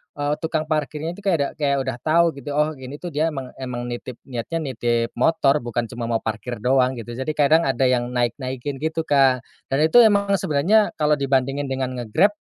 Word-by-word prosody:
eee, 145 0 -1
tukang 160 -1 -2
parkirnya 155 +1 -2
itu 205 - -14
kayak 190 -4 +3
udah 140 - 0
kayak 140 -2 +1
udah 130 -2 -3
tahu 165 +2 +4
gitu," 145 +2 -6
Oh 150 +1 +2
ini 130 +3 -9
tuh 175 - -4
dia 160 +1 0
emang 135 -3 -5
emang 125 -2 -5
nitip, 120 0 -7
niatnya 130 +6 -4
nitip 120 -3 -1
motor 140 +1 +3
bukan 120 -1 -2
cuma 120 0 -5
mau 115 -1 -1
parkir 110 +1 -5
doang," 130 +1 +3
gitu. 120 -2 -8
Jadi 130 +4 -2
kadang 155 +3 +4
ada 135 0 0
yang 125 -1 0
naik-naikin 130 +2 -2
gitu, 160 +2 -1
Kak. 135 -5 +3 0.3
Dan 135 +2 0
itu 240 - +4
emang 200 -2 +3
sebenarnya 185 +8 +2
kalau 150 -1 +1
dibandingin 135 0 0
dengan 130 -1 -2
nge-Grab, 140 - +2
135 Hz, 200 wpm, -22 LUFS, 125-155 Hz, 0.3 s, tahu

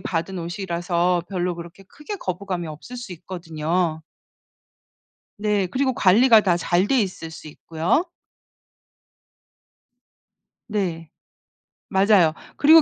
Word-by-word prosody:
받은 185 +2 -3
옷이라서 175 -1 -1
별로 180 -2 -1
그렇게 170 +3 -11
크게 300 - -8
거부감이 185 - -4
없을 155 +11 -9
수 235 -6 -7
있거든요. 165 -1 -2 1.4
네. 210 -2 +1
그리고 260 +6 0
관리가 225 +1 +6
다 185 -4 +2
잘 175 +3 +1
돼 265 -2 +3
있을 180 -5 -4
수 160 - -10
있고요. 165 - 0 2.6
네. 175 -8 -2 0.8
맞아요. 190 -5 +4 0.2
그리고 320 +3 +8
180 Hz, 220 characters per minute, -23 LUFS, 170-205 Hz, 2.6 s, 그리고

